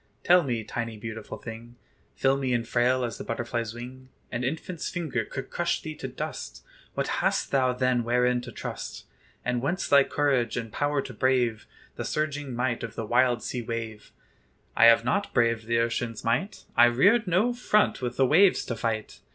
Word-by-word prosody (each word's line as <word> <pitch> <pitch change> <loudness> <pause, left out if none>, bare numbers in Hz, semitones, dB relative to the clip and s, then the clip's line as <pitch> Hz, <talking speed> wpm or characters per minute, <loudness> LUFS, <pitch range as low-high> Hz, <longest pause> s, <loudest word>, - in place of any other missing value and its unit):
Tell 180 +1 +6
me, 120 -7 -2
tiny, 115 0 -4
beautiful 110 0 -7
thing! 115 +1 -9 0.4
Filmy 135 -2 +1
and 115 -1 -2
frail 125 +2 +2
as 115 - -6
the - - -5
butterfly's 115 -1 -3
wing; 130 +2 -9 0.2
An 120 0 -2
infant's 160 +5 -3
finger 155 -9 -2
could 135 +5 -7
crush 175 0 0
thee 155 - -6
to - - -5
dust; - - -6 0.3
What - - -1
hast - - 0
thou 130 -2 +3
then 125 -1 +1
wherein 125 +1 +2
to 125 - -9
trust? - - -6 0.4
And 125 0 0
whence 170 +8 -1
thy 140 -1 +6
courage 135 -6 0
and 115 -2 -4
power 145 -1 0
to 125 - -8
brave 120 -2 +1 0.3
The - - -3
surging 145 -4 -2
might 120 -1 -1
of 115 -1 -6
the 115 - -3
wild 120 0 +2
sea 125 - -3
wave? 115 -2 -6 0.6
"I 115 - +6
have 115 0 +7
not 200 +10 -1
braved 115 -2 +2
the 115 0 +2
ocean's 115 -1 -1
might; 120 - -1
I 120 - +8
reared 195 - +4
no 195 +8 +2
front 215 - +2
with 120 -1 -3
the 135 - +4
waves 180 +8 +4
to 120 - -3
fight. 110 -1 -3
125 Hz, 185 wpm, -27 LUFS, 115-140 Hz, 0.6 s, I